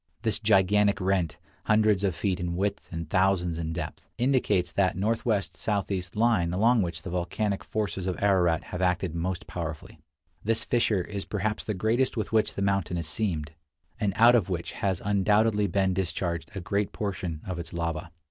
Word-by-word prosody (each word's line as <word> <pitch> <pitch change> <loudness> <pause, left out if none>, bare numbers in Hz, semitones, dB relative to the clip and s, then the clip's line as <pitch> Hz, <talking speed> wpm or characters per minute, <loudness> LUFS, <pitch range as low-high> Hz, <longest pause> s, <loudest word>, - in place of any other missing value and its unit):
This 110 - +1
gigantic 105 -1 +3
rent, 95 -5 0 0.3
hundreds 105 -2 +3
of 95 -4 +1
feet 95 -1 -1
in 85 -1 -2
width 100 +2 -2
and 85 -2 -4
thousands 90 -1 +1
in 80 -1 -3
depth, 80 -2 -6
indicates 110 -9 +2
that 95 -2 +1
northwest 110 0 0
southeast 95 -4 -2
line 105 -6 +2
along 115 +5 +4
which 85 -2 -3
the 95 - -5
volcanic 95 +3 -1
forces 100 -3 -3
of 90 - -1
Ararat 90 -5 +3
have 90 - -3
acted 90 -2 +1
most 85 +2 -3
powerfully. 80 -3 -6 0.4
This 110 +1 +1
fissure 115 -5 +2
is 100 +1 -5
perhaps 105 +1 -2
the 105 - -3
greatest 115 +7 +1
with 110 - -2
which 110 -1 +2
the 100 - -1
mountain 100 -3 0
is 85 - -3
seamed, 80 -3 -2 0.5
and 105 -3 +1
out 120 +2 +7
of 110 -7 +3
which 85 -2 -3
has 95 -3 -2
undoubtedly 105 +1 +3
been 95 0 +1
discharged 85 -3 -2
a 95 - -3
great 100 +2 -1
portion 90 -6 -3
of 90 -2 -4
its 85 - -7
lava. 85 0 -3
95 Hz, 175 wpm, -27 LUFS, 85-105 Hz, 0.5 s, out